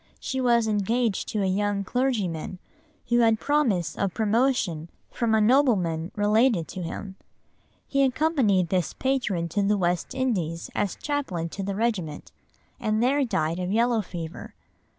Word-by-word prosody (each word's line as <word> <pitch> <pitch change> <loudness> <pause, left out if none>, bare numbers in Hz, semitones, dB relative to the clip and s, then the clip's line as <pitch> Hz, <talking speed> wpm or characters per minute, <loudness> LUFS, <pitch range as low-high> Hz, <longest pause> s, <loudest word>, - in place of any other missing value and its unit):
She 265 0 -3
was 235 -2 +3
engaged 215 +1 0
to 210 -2 -1
a - - +1
young 200 +1 0
clergyman 195 -8 -1 0.5
who 240 0 +3
had 225 -2 +4
promise 250 - +1
of 195 -3 -2
promotion 220 - +1 0.2
from 230 -2 +1
a - - +4
nobleman 210 - +2
related 210 - +2
to 185 - -6
him. 190 +3 -6 0.7
He 275 - +1
accompanied 255 - +2
this 180 -2 0
patron 235 -11 0
to 205 - 0
the 205 +1 +2
West 175 -2 -1
Indies 180 -11 -2
as 205 -3 -1
chaplain 230 - -3
to 195 - -6
the 195 0 -3
regiment, 180 - -2 0.5
and 215 +1 0
there 275 +3 +3
died 175 -8 -1
of 180 0 -2
yellow 230 +1 +2
fever. 170 -4 -8
210 Hz, 150 wpm, -26 LUFS, 180-245 Hz, 0.7 s, had